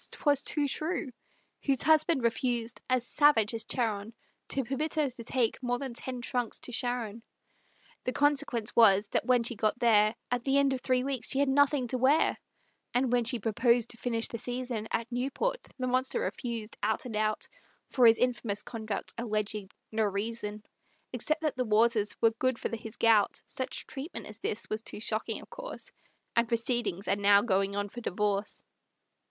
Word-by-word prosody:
'twas 285 -3 +2
too 295 -2 0
true, 310 0 -2 0.5
Whose 275 -3 +1
husband 310 -3 +4
refused, 235 0 -1
as 255 -1 +2
savage 265 -7 +4
as 225 -1 -2
Charon, 220 -2 -2 0.3
To 270 - -1
permit 275 +6 -2
her 300 -4 +1
to 235 -1 -9
take 240 0 0
more 245 -1 0
than 265 -1 -5
ten 250 +1 -2
trunks 245 -1 -2
to - - -5
Sharon. 235 -2 -2 0.8
The 255 - +1
consequence 275 -6 +1
was, 205 -3 +6
that - - -1
when 250 -2 +4
she 240 - -2
got 215 +2 0
there, 215 -2 +4 0.2
At 245 -1 0
the 270 +1 +2
end 280 -1 +3
of 255 - -3
three 255 -1 +1
weeks 265 -3 -2
she 270 - 0
had 280 0 +3
nothing 285 -1 +3
to 255 - 0
wear; 275 +5 +3 0.6
And 250 0 +2
when 245 -1 +2
she 245 +2 +1
proposed 235 +2 +2
to 235 - -8
finish 230 -1 0
the 230 - -6
season 245 -3 -3
At 230 +1 -2
Newport, 275 - -1 0.2
the 255 - -2
monster 255 - 0
refused, 235 - -4
out 220 +4 0
and 235 -3 -5
out, 215 0 0 0.4
For 250 -3 +6
his 225 0 +6
infamous 235 -5 0
conduct 220 -3 -5
alleging 215 -3 -2 0.2
no 220 0 +1
reason, 210 +1 -3 0.5
Except 310 +6 -1
that 305 -5 -1
the 255 - +1
waters 220 -1 +2
were 225 - +4
good 255 +2 0
for 230 - -3
his 220 0 -8
gout; 220 -3 +4
Such 260 0 -4
treatment 290 +5 -7
as 210 +1 -9
this 225 0 -2
was 215 +1 -3
too 225 - -7
shocking, 215 0 -2
of - - -17
course, - - -8 0.4
And 235 0 +3
proceedings 230 -4 0
are 195 - +3
now 200 0 +5
going 195 -2 +1
on 205 0 -1
for 240 +4 -9
divorce. 205 0 -1
235 Hz, 180 wpm, -30 LUFS, 220-260 Hz, 0.8 s, was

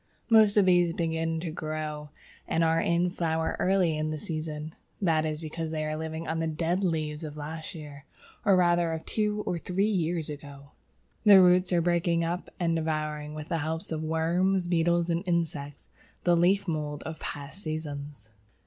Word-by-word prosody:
Most 215 -2 +6
of 205 - +6
these 175 -2 +4
begin 165 -1 -1
to 165 -2 -4
grow 155 -1 -4 0.4
and 165 - +1
are 165 0 +3
in 175 +1 +1
flower 160 -2 -1
early 185 -4 +2
in 155 0 -1
the 155 - -3
season. 155 0 -5 0.3
That 160 -5 +2
is 155 0 -3
because 160 0 -4
they 155 -1 -2
are 155 0 -2
living 160 +1 -5
on 160 0 -1
the 165 - 0
dead 170 +4 -1
leaves 155 -3 -1
of 150 -1 -6
the 150 - -7
last 160 +3 -6
year, 145 -3 -10 0.4
or 200 -3 +5
rather 175 -2 +3
of 160 - -5
two 210 -1 0
or 175 - -1
three 185 +4 0
years 175 -6 0
ago. 140 -1 -9 0.5
Their 200 -3 +9
roots 180 +1 +4
are 175 -1 +3
breaking 170 0 +1
up 175 +2 -3
and 170 -2 +1
devouring, 155 -2 -2
with 155 0 -7
the 165 -2 0
help 160 +2 -3
of 155 -1 -2
worms, 175 +4 +1
beetles, 170 0 +2
and 170 +2 0
insects, 150 -5 -2 0.4
the 175 -1 +4
leaf 190 +4 +3
mould 150 -3 -3
of 160 0 -6
past 145 +7 -6
seasons. 145 - -6
165 Hz, 185 wpm, -28 LUFS, 155-175 Hz, 0.5 s, Their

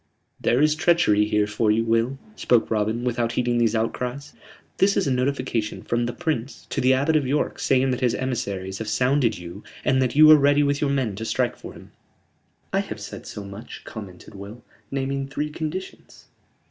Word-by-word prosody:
"There 125 +5 +2
is 155 0 +4
treachery 155 -11 +3
here 105 -1 +1
for 105 +1 0
you, 110 +2 +3
Will," 115 +3 +1 0.2
spoke 120 - +2
Robin, 110 +2 0
without 120 -1 -1
heeding 120 -1 +1
these 115 -1 +2
outcries. 125 +5 -3 0.5
"This 195 +1 +3
is - - +2
a 140 - 0
notification 125 -4 -1
from 120 0 -1
the - - -2
Prince 130 0 -4
to - - -1
the 130 - +4
Abbot 140 +5 +2
of 145 -4 +2
York 145 +3 -1
saying 130 0 +2
that 125 - -2
his 125 -2 +2
emissaries 100 -7 -3
have 110 - -5
sounded 125 +1 +1
you 85 0 -9 0.2
and 130 0 +3
that 130 -1 0
you 155 +1 +8
are 155 - +9
ready 145 +1 +4
with 140 0 0
your 145 - +1
men 130 -7 0
to 110 - -5
strike 110 - 0
for - - -10
him." - - -14 0.8
"I - - +3
have - - -5
said - - -8
so 105 - -7
much," 100 +4 -10
commented 100 -3 -10
Will, 100 +4 -10 0.3
"naming 135 0 -2
three 150 +2 -3
conditions." 160 +5 -7
125 Hz, 195 wpm, -24 LUFS, 110-140 Hz, 0.8 s, are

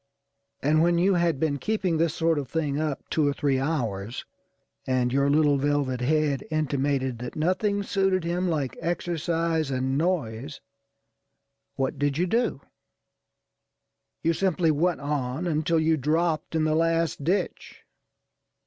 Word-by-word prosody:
And, 155 +3 +3
when 170 +1 +3
you 190 +3 +3
had 170 -5 +1
been 145 -2 0
keeping 195 -5 0
this 165 0 +1
sort 165 -2 +1
of 140 - -6
thing 150 -3 -1
up 150 -3 -3
two 155 -2 +2
or 145 - +1
three 140 -2 0
hours, 120 -7 -2 0.6
and 125 -1 +1
your 140 +1 +2
little 145 -1 +3
velvet 140 -3 0
head 145 +1 +1
intimated 140 -4 -1
that 125 0 -6
nothing 200 +5 0
suited 195 -2 +1
him 175 +2 -1
like 145 -6 -1
exercise 165 -2 -1
and 130 +1 0
noise, 145 -6 -2 1.2
what 135 +1 -2
did 145 0 0
you 175 - +2
do? 225 - 0 1.6
You 165 - +3
simply 180 -2 +1
went 165 +2 0
on 140 +1 -2
until 160 0 +1
you 160 0 +2
dropped 160 +3 0
in 160 - +2
the 155 0 +2
last 165 -1 +1
ditch. 185 +7 -2
155 Hz, 140 wpm, -26 LUFS, 140-170 Hz, 1.6 s, And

